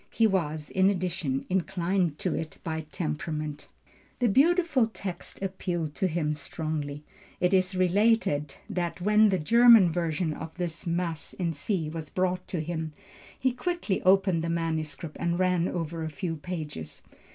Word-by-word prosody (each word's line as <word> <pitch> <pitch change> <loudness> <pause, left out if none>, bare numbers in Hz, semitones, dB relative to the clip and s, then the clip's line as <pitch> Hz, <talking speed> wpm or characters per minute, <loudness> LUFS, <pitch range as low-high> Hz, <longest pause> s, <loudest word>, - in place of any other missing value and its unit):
He 225 - +2
was, 160 -7 0
in 190 +1 +4
addition, 175 -8 -1
inclined 180 -3 0
to 180 - -1
it 160 -1 -4
by 160 -2 -4
temperament. 150 -2 -3 0.5
The 245 -2 +2
beautiful 300 - +4
text 200 -5 -6
appealed 175 -5 -2
to 190 - 0
him 155 -3 0
strongly. 155 -3 -4 0.4
It 180 +1 +2
is 185 0 +2
related 185 -6 +2
that 175 -1 -2
when 210 +3 +5
the 190 - +2
German 230 +2 +7
version 165 -1 -1
of 160 +2 -8
his 175 -3 -2
first - - -11
Mass 170 -2 -2
(in 170 -3 -2
C) 165 +1 -1
was 155 -1 -6
brought 185 0 -1
him, 160 -2 -3 0.5
he 260 - +2
quickly 250 - -2
opened 190 -3 +4
the 165 - -1
manuscript 160 -1 -3
and 170 0 0
ran 180 -1 +2
over 165 -1 -3
a 160 - -2
few 165 +2 -3
pages. 150 - -6
175 Hz, 150 wpm, -28 LUFS, 160-190 Hz, 0.5 s, German